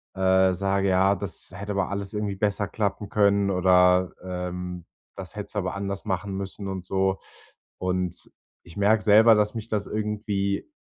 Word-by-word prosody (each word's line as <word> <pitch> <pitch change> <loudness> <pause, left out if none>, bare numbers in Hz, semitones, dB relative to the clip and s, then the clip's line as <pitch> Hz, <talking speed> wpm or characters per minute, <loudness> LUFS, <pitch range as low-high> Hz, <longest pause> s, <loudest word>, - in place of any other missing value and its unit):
äh, 95 0 +3
sage: 95 +1 0
„Ja, 95 +2 +3
das 100 -4 -6
hätte 100 +2 -5
aber 100 -1 0
alles 100 0 -4
irgendwie 105 -1 -2
besser 100 0 -1
klappen 105 -1 -2
können“, 100 -1 +3
oder, 90 0 +4
ähm: 90 -1 -5 0.3
„Das - - -9
hättest - - -6
du - - +1
aber 90 - -3
anders 100 0 -4
machen 95 0 -2
müssen“, 100 +1 -5
und 95 -2 -4
so. 95 0 0 0.6
Und 90 -1 -3 0.3
ich 85 - -14
merke 105 +2 +3
selber, 110 +2 +7
dass 105 +1 +1
mich 115 0 -6
das 105 -2 -1
irgendwie 105 -2 -2
100 Hz, 165 wpm, -25 LUFS, 95-100 Hz, 0.6 s, selber